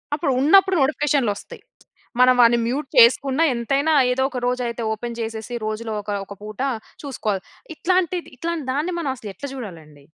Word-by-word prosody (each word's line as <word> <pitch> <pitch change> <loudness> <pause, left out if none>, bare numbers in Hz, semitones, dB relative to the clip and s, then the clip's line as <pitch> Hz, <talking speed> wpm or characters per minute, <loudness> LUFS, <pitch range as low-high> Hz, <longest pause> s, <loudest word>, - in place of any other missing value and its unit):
అప్పుడు 295 -2 -1
ఉన్నప్పుడు 380 +5 +5
నోటిఫికేషన్లు 275 -4 +1
ఒస్తాయి. - - -11 0.6
మనం 255 0 +6
వాని 240 0 +6
మ్యూట్ 270 +3 -2
చేసుకున్న 265 +5 +5
ఎంతైనా 275 +6 0 0.2
ఏదో 265 +1 +1
ఒక 255 - -4
రోజు 250 0 0
అయితే 235 0 -5
ఓపెన్ 235 +2 -6
జేసేసి 225 +1 -5
రోజులో 215 +1 -4
ఒక 205 - -11 0.2
ఒక 200 - -9
పూట 215 +1 -9 0.4
చూసుకోవాలి. 215 -8 -3 0.3
ఇట్లాంటిది 355 +1 0
ఇట్లాంటి 330 0 -3
దాన్ని 320 +6 -1
మనం 280 -5 -2
అసలు 215 -5 -8
ఎట్ల 195 - -8
జూడాలండి. 160 - -10
250 Hz, 160 wpm, -22 LUFS, 220-295 Hz, 0.6 s, మనం